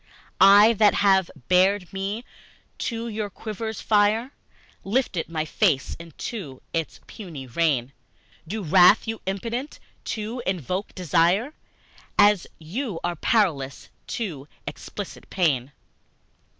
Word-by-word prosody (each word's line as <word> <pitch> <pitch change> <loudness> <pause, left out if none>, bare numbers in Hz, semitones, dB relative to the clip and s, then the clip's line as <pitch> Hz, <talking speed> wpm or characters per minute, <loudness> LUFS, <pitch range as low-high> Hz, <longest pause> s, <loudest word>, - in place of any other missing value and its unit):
I, 205 +4 +8
that 210 -2 +5
have 190 -3 +3 0.2
bared 185 +1 +3
me 200 +5 -3 0.5
to 230 -1 -3
your 215 -2 -3
quiver's 220 +2 -6
fire, 215 +4 +2 0.5
Lifted 195 -6 -1
my 155 -2 -2
face 155 -5 +1
into 165 - -7
its 165 -1 -3
puny 165 - -9
rain, 135 -1 0 0.5
Do 210 +4 -4
wreathe 180 +5 +6
you 225 0 -4
Impotent 235 +8 -3 0.3
to 225 +3 -4
Evoke 185 - -2
Desire 180 - +2 0.6
As 205 -2 +5
you 190 - -4
are 175 0 -1
Powerless 155 - 0 0.3
to 160 - -4 0.2
Elicit 205 -2 -8
Pain! 145 -8 +1
195 Hz, 110 wpm, -24 LUFS, 165-220 Hz, 0.6 s, I